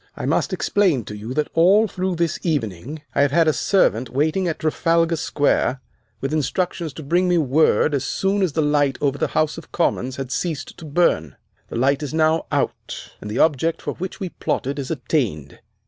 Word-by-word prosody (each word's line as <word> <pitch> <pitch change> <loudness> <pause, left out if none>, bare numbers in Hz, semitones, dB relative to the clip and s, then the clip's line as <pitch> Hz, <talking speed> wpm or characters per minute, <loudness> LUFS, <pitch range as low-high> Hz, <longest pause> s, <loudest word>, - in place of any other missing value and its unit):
I - - -4
must - - +1
explain 180 - +1
to 105 - -7
you, 110 +5 -6
that 150 - -1
all 195 +7 +5
through 185 -1 -2
this 170 0 -1
evening 145 - -3
I - - +2
have 140 - +4
had 165 +2 +3
a 155 - +4
servant 130 - +2
waiting 155 +7 0
in 165 - -1
Trafalgar 165 +1 +1
Square 145 -3 +1 0.4
with 135 +2 -2
instructions 165 +2 -1
to 155 - -8
bring 175 +6 +2
me 180 -1 +3
word 150 +1 +3
as 140 -2 0
soon 195 +7 0
as 180 -6 +1
the 160 - +1
light 145 -2 +2
over 140 -1 0
the - - +1
House 155 +1 +1
of - - -16
Commons 130 -6 0
had 135 -2 -5
ceased 160 -3 -3
to 165 - -9
burn. 140 - +1 0.3
The - - -7
light 135 +4 +2
is 150 +1 -4
now 160 0 +2
out, - - -3
and 105 - -7
the 105 - -3
object 160 +1 +2
for - - -4
which 185 +4 -6
we 190 -3 -3
plotted 140 -3 -3
is 135 - -4
attained." 120 - -2
155 Hz, 200 wpm, -22 LUFS, 135-170 Hz, 0.4 s, all